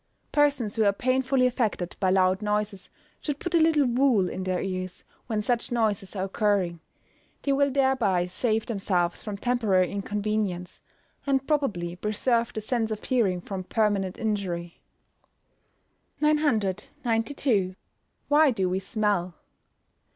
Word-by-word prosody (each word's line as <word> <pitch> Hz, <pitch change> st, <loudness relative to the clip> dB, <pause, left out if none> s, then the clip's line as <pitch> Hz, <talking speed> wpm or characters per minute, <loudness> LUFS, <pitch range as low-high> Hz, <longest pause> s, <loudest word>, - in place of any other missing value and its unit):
Persons 285 Hz, -8 st, +2 dB
who 220 Hz, -, +4 dB
are 200 Hz, -, +5 dB
painfully 255 Hz, +3 st, +1 dB
affected 225 Hz, -8 st, -1 dB
by 190 Hz, -, +2 dB
loud 185 Hz, +1 st, +3 dB
noises 210 Hz, -2 st, -2 dB, 0.3 s
should 295 Hz, -3 st, -3 dB
put 350 Hz, +3 st, -5 dB
a 335 Hz, -, +5 dB
little 315 Hz, -3 st, +4 dB
wool 245 Hz, -6 st, +3 dB
in 185 Hz, -, -5 dB
their 185 Hz, -1 st, 0 dB
ears 185 Hz, -1 st, -4 dB, 0.2 s
when 215 Hz, -3 st, -1 dB
such 240 Hz, +2 st, -1 dB
noises 215 Hz, -4 st, 0 dB
are 190 Hz, -, -1 dB
occurring; 195 Hz, -4 st, 0 dB, 0.6 s
they 280 Hz, -, +2 dB
will 280 Hz, +1 st, +3 dB
thereby 260 Hz, -10 st, +2 dB
save 220 Hz, +4 st, -1 dB
themselves 185 Hz, -5 st, 0 dB
from 210 Hz, -2 st, -5 dB
temporary 205 Hz, -5 st, +1 dB
inconvenience, 200 Hz, -3 st, -2 dB, 0.5 s
and 270 Hz, -1 st, +1 dB
probably 205 Hz, -, 0 dB
preserve 230 Hz, +5 st, 0 dB
the 215 Hz, -, -4 dB
sense 225 Hz, 0 st, -1 dB
of 215 Hz, -1 st, -4 dB
hearing 215 Hz, -9 st, +1 dB
from 190 Hz, 0 st, -5 dB
permanent 200 Hz, -2 st, 0 dB
injury. 185 Hz, -6 st, -3 dB, 1.4 s
992. 225 Hz, -5 st, 0 dB, 0.5 s
_Why 295 Hz, -3 st, +4 dB
do 190 Hz, -3 st, +1 dB
we 185 Hz, +1 st, 0 dB
smell? 195 Hz, -4 st, -1 dB
210 Hz, 130 wpm, -26 LUFS, 190-250 Hz, 1.4 s, are